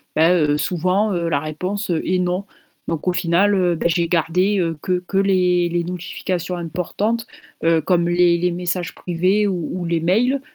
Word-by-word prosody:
bah, 160 +2 +4
heu, 150 -4 +2
souvent, 185 +6 0
heu, 170 -2 -1
la 145 - +1
réponse 180 +7 -4
est 175 +2 0
«Non» 180 +2 -1 0.4
donc 165 +1 -3
au 180 - +3
final, 180 +4 +2
heu, 180 -2 +2
bah 160 - -5
j'ai 170 0 0
gardé, 180 +4 +1
heu, 165 -2 0
que 180 -1 0
que 195 - -2
les 180 -3 +2
les 170 0 -1
notifications 180 0 -4
importantes, 205 +7 -2 0.4
heu, 165 0 +4
comme 175 0 +1
les 175 0 +4
les 180 +1 0
messages 180 0 -3
privés 185 +4 0
ou 180 -5 -2
ou 175 - -4
les 170 -1 0
mails, 240 +11 +2
180 Hz, 180 wpm, -20 LUFS, 170-185 Hz, 0.4 s, bah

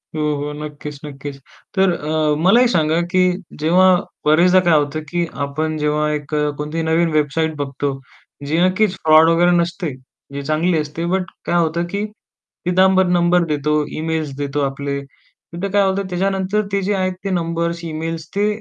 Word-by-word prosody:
हो, 155 - -1
हो. 145 +1 -4
नक्कीच, 150 -1 -8
नक्कीच. 140 0 -7 0.4
तर 190 -1 +4
अ, 155 -1 0
मला 215 +7 +6
एक 250 - +4
सांगा 160 -3 +2
की 185 -1 +3 0.4
जेव्हा 180 +4 +5 0.3
बऱ्याचदा 175 +5 +5
काय 175 -3 +3
होतं 145 +2 -1
की 175 -1 0 0.2
आपण 155 +2 -3
जेव्हा 150 0 0
एक 150 0 -4
अ, 150 0 +1
कोणतीही 150 +2 -3
नवीन 165 +1 +2
वेबसाईट 155 +1 0
बघतो, 140 0 -2 0.5
जी 155 +3 0
नक्कीच 185 +2 +2
फ्रॉड 160 +1 +5
वगैरे 175 +1 +4
नसते. 170 -3 -1 0.4
जी 140 - -4
चांगली 160 +3 +1
असते, 155 +2 -3
बट 185 +1 0 0.2
काय 175 - 0
होतं 170 0 +1
की 200 +1 -1 0.6
तिथं 180 +1 +2
आपण 190 -1 +3
नंबर 175 0 +3
देतो, 150 0 0 0.2
इमेल्स 160 -2 -2
देतो 145 0 -2
आपले 140 0 -2 0.5
तिथं 190 +3 -3
काय 200 -1 +3
होतं. 195 0 0
त्याच्यानंतर 195 +3 0
ते 200 0 0
जे 205 +2 0
आहेत 185 -1 0
ते 195 - -2
नंबर्स, 170 -1 -2
इमेल्स 165 0 -4
ते 205 +1 +2
165 Hz, 170 wpm, -19 LUFS, 150-180 Hz, 0.6 s, मला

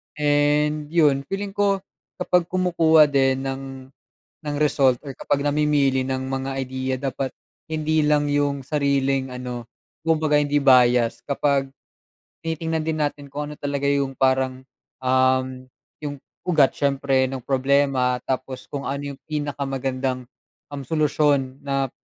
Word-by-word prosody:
And 150 0 +2
yun, 145 -4 +2
feeling 195 +1 -3
ko 200 -1 +1 0.3
kapag 180 -1 +1
kumukuha 170 -4 +4
din 135 -1 +2
ng 135 0 -4 0.8
ng 150 -1 -3
result 135 -4 +3
or 135 - -6
kapag 140 +2 -1
namimili 145 -3 +2
ng 130 0 -3
mga 135 0 -3
idea 130 0 -2
dapat 135 0 -3 0.4
hindi 155 0 +1
lang 150 0 +2
yung 145 -2 0
sariling 140 -2 0
ano, 125 -2 -6 0.3
kumbaga 160 -2 +1
hindi 145 0 +3
bias. 125 -4 +4
Kapag 140 -1 0 0.7
tinitignan 160 0 -2
din 160 0 -2
natin 145 -1 -6
kung 145 +2 -5
ano - - -11
talaga 140 -1 -3
yung 140 -1 +1
parang, 130 0 +1 0.4
um, 130 0 +1 0.4
yung 145 -1 -4 0.3
ugat 155 -6 +3
siyempre 135 -1 +2
nung 130 0 -5
problema, 135 -1 +1
tapos 130 0 -4
kung 140 -1 -5
ano 140 +1 -3
yung 135 - -15
pinakamagandang, 135 -4 -3 0.4
um, 145 -1 -6
solusyon 145 -3 +1
na 135 -1 0
140 Hz, 130 wpm, -23 LUFS, 130-150 Hz, 0.8 s, kumukuha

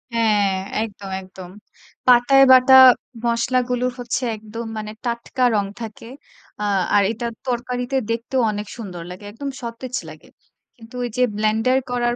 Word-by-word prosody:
হ্যাঁ, 210 -3 +2 0.3
একদম, 205 -3 -8
একদম। 185 -1 -12 0.6
পাটায় 250 +2 +6
বাটা 260 0 +7 0.5
মসলাগুলো 245 +1 0
হচ্ছে 245 +2 -3
একদম 220 +2 -8
মানে 215 0 -5
টাটকা 235 +1 -3
রং 205 -1 +1 0.2
থাকে। 220 -1 -8 0.6
আ - - -1 0.3
আর 205 - +5
এটা 230 +1 -5 0.2
তরকারিতে 250 +1 -3 0.2
দেখতেও 240 +3 -1
অনেক 210 0 -5
সুন্দর 185 -7 -7
লাগে। 185 +3 -10
একদম 275 +6 -6
সতেজ 235 +2 -6
লাগে। - - -14 0.5
কিন্তু 230 +1 -14
ওইযে 245 +1 -3 0.2
ব্লেন্ডার 220 +4 +2
করার 240 -1 0
235 Hz, 135 wpm, -21 LUFS, 215-250 Hz, 0.6 s, বাটা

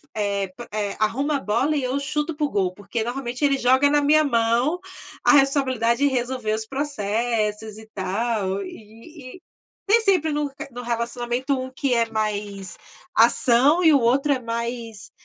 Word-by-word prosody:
eh 200 -2 -1 0.3
eh, 205 -2 -2
arruma 275 +7 0
a - - -5
bola 260 +7 0
e 270 - -1
eu 260 +3 -1
chuto 300 +3 -2
para 300 0 0
o - - -2
gol 190 -3 0
porque 205 +3 -4
normalmente 245 +2 -4
ele 275 -1 +2
joga 260 +3 +4
na 295 0 +3
minha 305 +2 +4
mão 240 +5 +1 0.5
a - - +6
responsabilidade 265 -4 +2
de 270 - -1
resolver 245 -3 -1
os 220 0 -3
processos 220 -5 -2
e 220 - -13
tal, 200 0 -2
e 230 - -12
e 365 - -15 0.5
tem 455 +3 +5
sempre 365 -7 +2
no 295 -1 -2 0.2
no 245 +1 -7
relacionamento 240 +3 -2
um 260 0 -6
que 260 -1 -1
é 230 -1 +1
mais 205 -3 -3 0.4
ação 260 +7 +4
e 320 -2 +6
o 280 - +5
outro 275 +5 +2
é 260 - -2
mais 230 -2 -5
240 Hz, 170 wpm, -23 LUFS, 220-280 Hz, 0.5 s, a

